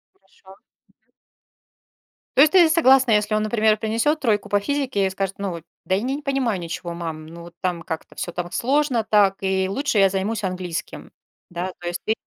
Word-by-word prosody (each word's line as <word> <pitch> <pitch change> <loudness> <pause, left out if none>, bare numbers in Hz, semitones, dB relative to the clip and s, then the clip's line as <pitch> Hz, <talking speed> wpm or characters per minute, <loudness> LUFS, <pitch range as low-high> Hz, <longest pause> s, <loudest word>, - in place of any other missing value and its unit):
Хорошо. 190 0 -25
Мгм. 195 - -19 1.6
То - - +8
есть 310 +4 +6
ты 360 -3 +7
и - - +2
согласна, 265 -6 +5
если 210 0 +2
он, 215 - +1
например, 215 0 +2
принесёт 230 +8 0
тройку 210 -5 +1
по 205 - +2
физике 260 -4 -1
и - - +1
скажет: 195 0 -3
"Ну, 200 -2 -3
во 170 -1 -6 0.2
да, 185 - +1
я 200 - -1
ни 260 +3 -2
не 290 - -4
понимаю 265 -8 -1
ничего, 170 0 -5
мам, 160 -2 -6
ну, 170 +1 -11
вот 170 0 -13
там 180 -2 -2
как-то 160 0 -7
всё 175 - -4
там 175 0 -5
сложно 265 -2 +1
так, 205 -2 +3
и 190 0 0
лучше 250 +4 -1
я 195 -1 +5
займусь 205 +3 -2
английским". 180 -2 -5 0.4
Да, 180 +1 -4
то 175 - -7
есть 175 0 -3
ты 220 - +2
200 Hz, 205 wpm, -22 LUFS, 180-235 Hz, 1.6 s, То